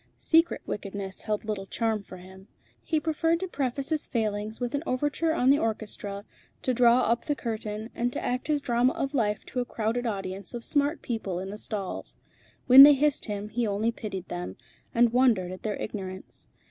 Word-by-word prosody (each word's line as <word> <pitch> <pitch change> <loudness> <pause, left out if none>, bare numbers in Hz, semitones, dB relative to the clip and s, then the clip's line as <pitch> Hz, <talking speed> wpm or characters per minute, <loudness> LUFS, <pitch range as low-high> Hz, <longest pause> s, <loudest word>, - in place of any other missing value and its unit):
Secret 330 +1 +2
wickedness 195 -1 -5
held 215 0 -2
little 205 -3 -3
charm 225 -1 -1
for 190 -2 -11
him. 190 +2 -14 0.4
He 315 - 0
preferred 325 +2 +1
to 375 - -2
preface 275 -4 -2
his 310 -2 -1
failings 215 -2 -2
with 245 -1 -3
an 285 - 0
overture 290 +5 0
on 265 -5 +3
the 285 - +4
orchestra, 210 -2 -4 0.4
to 255 - +1
draw 240 0 +5
up 235 0 +1
the 295 - 0
curtain, 220 -2 -5
and 240 +1 -1
to - - -3
act 250 +1 -2
his 300 -2 +1
drama 245 0 +2
of 275 +1 -3
life 210 -6 0
to 250 - -4
a 245 - 0
crowded 235 +2 -2
audience 195 +1 -4
of 235 - -6
smart 290 +2 0
people 215 -7 -3
in 190 +1 -5
the 210 - -7
stalls. 200 -4 -5 0.5
When 260 +1 +10
they 290 +1 +11
hissed 290 +1 +1
him, 205 -1 -4
he 235 +1 -1
only 210 +3 0
pitied 195 -5 -6
them, 90 +2 -5 0.4
and 235 0 +3
wondered 230 -8 +3
at 185 - -8
their 210 -2 -2
ignorance. 190 -3 -7
230 Hz, 195 wpm, -27 LUFS, 205-260 Hz, 0.5 s, they